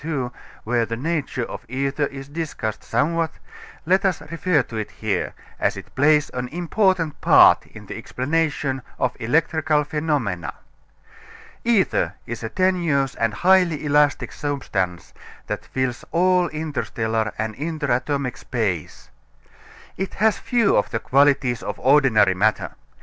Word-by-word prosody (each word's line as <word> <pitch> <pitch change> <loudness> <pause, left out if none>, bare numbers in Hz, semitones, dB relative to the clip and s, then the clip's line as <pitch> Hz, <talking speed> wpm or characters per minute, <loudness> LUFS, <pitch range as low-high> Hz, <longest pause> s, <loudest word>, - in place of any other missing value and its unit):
II, 140 -6 -2 0.3
where 120 +1 +1
the 115 0 -3
nature 145 -2 -2
of - - -8
ether 140 +3 -1
is 135 0 -9
discussed 145 -8 -4
somewhat, 160 +7 0 0.5
let 185 +4 +3
us 190 -3 +1
refer 165 -2 +2
to 115 - -10
it 110 -1 -3
here, - - -3 0.2
as - - 0
it - - -10
plays 150 +2 +3
an 125 0 -3
important 175 +1 0
part - - +6
in - - -13
the - - -7
explanation 145 -1 -1 0.2
of 125 - 0
electrical 150 +4 +1
phenomena. 145 - -2 1.1
Ether 230 -5 +2
is 120 0 -6
a 110 - -4
tenuous 170 -6 +1
and 115 -1 0
highly 175 - +3
elastic 145 0 +2
substance 95 - -3 0.3
that - - -4
fills 130 -2 -2
all 180 +1 +3
interstellar 115 -8 -2
and 110 0 -3
interatomic 140 -3 -1
space. 100 -10 -3 0.9
It 190 +1 -4
has 220 +1 +2
few 235 -5 +2
of - - +1
the 115 - -1
qualities 135 -2 +2
of - - -5
ordinary 130 -8 +4
matter. 105 +4 +1
145 Hz, 135 wpm, -22 LUFS, 120-165 Hz, 1.1 s, part